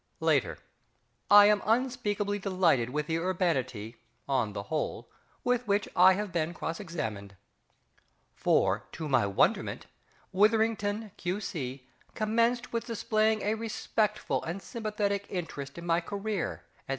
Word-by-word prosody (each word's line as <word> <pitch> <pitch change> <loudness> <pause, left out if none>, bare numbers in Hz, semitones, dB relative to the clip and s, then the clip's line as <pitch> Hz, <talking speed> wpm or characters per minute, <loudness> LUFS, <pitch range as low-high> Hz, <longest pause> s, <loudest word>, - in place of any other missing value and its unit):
Later. - - +1 0.7
I 205 0 +9
am 210 0 +4
unspeakably 210 -3 0
delighted 180 - +2
with 150 +3 -2
the 160 +1 -1
urbanity 130 - -1 0.3
(on 125 -7 0
the 100 - -4
whole) 155 +8 -3 0.3
with 245 -1 0
which 200 0 +1
I 185 +1 +7
have 205 0 -3
been 170 0 -1
cross 165 0 -4
examined. 110 - -5 1.0
For, - - +1
to 160 - -5
my 130 -7 +3
wonderment, 100 - +1 0.5
WITHERINGTON, 215 0 +2
Q.C., 155 -9 -4 0.3
commenced 230 +3 +1
with 230 - -2
displaying 220 -1 +1
a 210 - +1
respectful 220 -1 -1
and 170 +4 -4
sympathetic 205 -1 -2
interest 150 -6 -5
in 170 - -7
my 170 0 +2
career, 200 +1 -3 0.2
&c. - - -30
195 Hz, 125 wpm, -29 LUFS, 155-215 Hz, 1.0 s, I